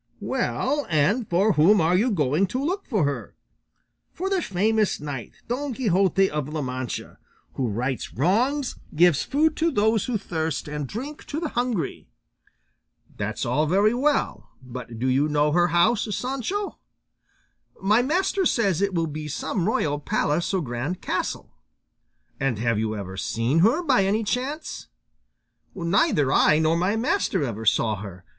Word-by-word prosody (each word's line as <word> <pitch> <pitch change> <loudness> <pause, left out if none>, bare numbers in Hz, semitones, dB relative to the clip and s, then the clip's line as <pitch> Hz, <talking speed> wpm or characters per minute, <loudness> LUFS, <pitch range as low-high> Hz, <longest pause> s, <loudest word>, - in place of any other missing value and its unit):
Well, 290 +2 -1
and 185 - +1
for 195 +5 +3
whom 185 +7 +5
are 165 +2 +3
you 220 +7 +3
going 160 - +1
to 255 +8 -2
look 380 +5 -2
for 210 - +1
her? 140 -1 -4 0.8
For 380 +2 -4
the 380 -2 +2
famous 215 - +1
knight 145 -5 -6
Don 260 +1 -3
Quixote 195 - +2
of 150 -2 -3
La 155 -1 -3
Mancha, 130 -1 -5 0.3
who 130 - -1
rights 125 +5 -3
wrongs, 245 - 0 0.2
gives 170 -2 +5
food 310 +2 +1
to 330 +1 +2
those 220 - +2
who 245 -3 -1
thirst 160 -7 -3
and 150 -1 -4
drink 275 - -7
to 300 - -4
the 325 -2 -3
hungry. 240 - -2 1.1
That's - - -3
all 155 +1 +1
very 200 +6 +3
well, 285 +4 0
but 125 -2 -8
do 120 - -2
you 135 +3 +2
know 150 0 +2
her 175 +2 +3
house, 175 +7 +2
Sancho? 275 - -3 1.0
My 210 +5 +3
master 370 +8 +1
says 195 -7 +1
it 200 -2 0
will 165 -1 +1
be 155 0 -5
some 160 - -2
royal 145 -9 0
palace 150 +2 0
or 190 -2 0
grand 130 +8 -4
castle. - - -3 0.9
And 135 -5 0
have 115 0 0
you 110 0 -1
ever 95 -2 -6
seen 115 +10 0
her 235 - +3
by 255 - +3
any 210 +3 +1
chance? 260 +8 -3 0.9
Neither 170 - +2
I 155 - +5
nor 160 +1 +2
my 180 +5 +1
master 225 - 0
ever 115 -4 -4
saw 110 -1 +2
her. 95 -2 -9
180 Hz, 155 wpm, -24 LUFS, 145-240 Hz, 1.1 s, whom